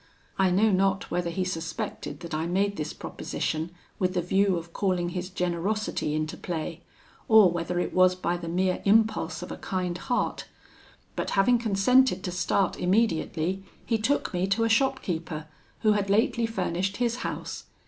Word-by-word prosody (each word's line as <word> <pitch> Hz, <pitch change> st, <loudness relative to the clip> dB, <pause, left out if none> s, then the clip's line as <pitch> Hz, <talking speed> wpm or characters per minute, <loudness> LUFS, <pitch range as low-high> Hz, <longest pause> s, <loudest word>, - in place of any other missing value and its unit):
I 190 Hz, -1 st, +4 dB
know 205 Hz, +4 st, +3 dB
not 195 Hz, 0 st, +1 dB
whether 175 Hz, -1 st, 0 dB
he 185 Hz, +2 st, -1 dB
suspected 165 Hz, -1 st, -4 dB
that 170 Hz, -2 st, -7 dB
I 160 Hz, +2 st, -1 dB
made 200 Hz, +3 st, +1 dB
this 150 Hz, -, -3 dB
proposition 160 Hz, +2 st, -3 dB, 0.3 s
with 185 Hz, 0 st, 0 dB
the 180 Hz, -, +2 dB
view 190 Hz, +1 st, +2 dB
of 170 Hz, 0 st, -8 dB
calling 180 Hz, -3 st, 0 dB
his 180 Hz, +1 st, -4 dB
generosity 180 Hz, -2 st, -1 dB
into 155 Hz, 0 st, -2 dB
play, 165 Hz, -3 st, -4 dB, 0.5 s
or 215 Hz, -5 st, +7 dB
whether 175 Hz, +1 st, -2 dB
it -, -, -2 dB
was 185 Hz, 0 st, +5 dB
by 180 Hz, -1 st, -1 dB
the 175 Hz, -1 st, -6 dB
mere 180 Hz, +2 st, 0 dB
impulse 215 Hz, -5 st, +2 dB
of -, -, -7 dB
a -, -, -5 dB
kind 180 Hz, -2 st, -3 dB
heart; 245 Hz, +4 st, -1 dB, 0.7 s
but, -, -, -2 dB
having 240 Hz, +5 st, +5 dB
consented 225 Hz, 0 st, +3 dB
to 180 Hz, -, -3 dB
start 190 Hz, +2 st, 0 dB
immediately, 185 Hz, -2 st, +1 dB, 0.2 s
he 225 Hz, -2 st, +1 dB
took 240 Hz, 0 st, 0 dB
me 180 Hz, +1 st, 0 dB
to 205 Hz, +4 st, +1 dB
a 230 Hz, -, +2 dB
shopkeeper, 180 Hz, -, 0 dB, 0.4 s
who 215 Hz, -, +4 dB
had 205 Hz, -1 st, +1 dB
lately 225 Hz, +2 st, +2 dB
furnished 190 Hz, -2 st, -2 dB
his 240 Hz, -1 st, 0 dB
house. 255 Hz, -, -5 dB
185 Hz, 170 wpm, -27 LUFS, 175-215 Hz, 0.7 s, or